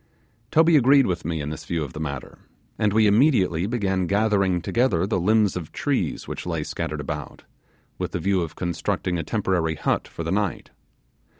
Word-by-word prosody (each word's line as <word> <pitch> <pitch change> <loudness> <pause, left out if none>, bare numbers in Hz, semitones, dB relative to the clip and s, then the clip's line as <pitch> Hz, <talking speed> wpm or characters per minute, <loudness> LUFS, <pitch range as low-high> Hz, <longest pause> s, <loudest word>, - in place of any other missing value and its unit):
Toby 160 +2 +5
agreed 135 +1 +5
with 90 -3 -2
me 80 -2 -2
in 75 +1 -4
this 75 - -7
view 85 -2 -2
of 70 - -7
the - - -7
matter, 70 -4 -6 0.4
and 105 - +2
we 110 +1 +4
immediately 100 - +3
began 95 -6 0
gathering 100 -2 +2
together 95 -3 +1
the 100 -2 0
limbs 105 +1 +3
of 85 -4 -6
trees - - -2
which - - -6
lay 85 -3 -2
scattered - - -4
about, - - -6 0.6
with - - -3
the - - -2
view 95 -2 +1
of 80 -2 -5
constructing 85 0 -2
a - - -2
temporary 85 -3 0
hut 75 - -1
for 85 - -7
the 80 - -3
night. 100 -2 -2
95 Hz, 185 wpm, -24 LUFS, 85-110 Hz, 0.6 s, Toby